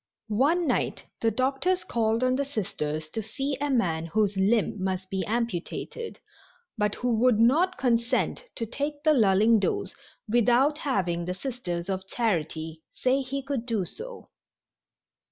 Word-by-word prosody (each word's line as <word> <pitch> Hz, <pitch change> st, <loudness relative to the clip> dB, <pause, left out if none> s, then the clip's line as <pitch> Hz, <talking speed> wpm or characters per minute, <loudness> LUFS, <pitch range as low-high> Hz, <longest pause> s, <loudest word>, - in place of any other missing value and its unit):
One 290 Hz, +11 st, +2 dB
night -, -, 0 dB
the 230 Hz, -, +2 dB
doctors 270 Hz, -, 0 dB
called 225 Hz, +1 st, 0 dB
on 255 Hz, 0 st, +3 dB
the 280 Hz, -, +1 dB
Sisters 155 Hz, -, -3 dB
to 220 Hz, -, -2 dB
see 270 Hz, +6 st, -3 dB
a 290 Hz, -, 0 dB
man 165 Hz, -11 st, +1 dB
whose 205 Hz, +3 st, +1 dB
limb 200 Hz, 0 st, +1 dB
must 185 Hz, 0 st, -2 dB
be 190 Hz, -1 st, -1 dB
amputated, 235 Hz, -, -3 dB, 0.6 s
but 210 Hz, -2 st, 0 dB
who 245 Hz, -1 st, 0 dB
would 245 Hz, -2 st, +4 dB
not 320 Hz, +11 st, +4 dB
consent 240 Hz, -, +1 dB
to 230 Hz, -, -2 dB
take 290 Hz, +5 st, -4 dB
the 310 Hz, -1 st, +5 dB
lulling 220 Hz, -2 st, +5 dB
dose 190 Hz, 0 st, -1 dB, 0.3 s
without 245 Hz, +6 st, +3 dB
having 180 Hz, -, 0 dB
the 180 Hz, +1 st, -3 dB
Sisters 190 Hz, -8 st, -4 dB
of 190 Hz, -1 st, -3 dB
Charity 160 Hz, -8 st, -2 dB
say 260 Hz, +2 st, +1 dB
he 275 Hz, +1 st, -4 dB
could 265 Hz, -3 st, -3 dB
do 220 Hz, -6 st, 0 dB
so. 475 Hz, -, -8 dB
230 Hz, 150 wpm, -27 LUFS, 190-270 Hz, 0.6 s, the